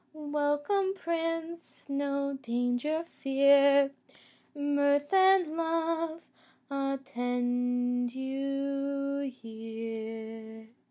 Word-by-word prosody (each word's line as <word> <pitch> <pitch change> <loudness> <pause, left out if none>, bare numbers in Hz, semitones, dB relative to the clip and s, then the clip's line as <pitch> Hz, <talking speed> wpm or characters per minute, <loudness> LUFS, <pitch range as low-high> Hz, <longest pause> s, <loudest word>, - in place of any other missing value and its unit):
Welcome, 300 +6 0
prince, 330 -1 -4
no 280 0 -1
danger 245 +6 0
fear, 280 0 +4 0.6
Mirth 285 +1 +1
and 380 -2 +6
love 330 0 -1 0.5
attend 245 -2 -1
you 275 +1 -2
here." 225 -1 -7
280 Hz, 60 wpm, -30 LUFS, 245-305 Hz, 0.6 s, and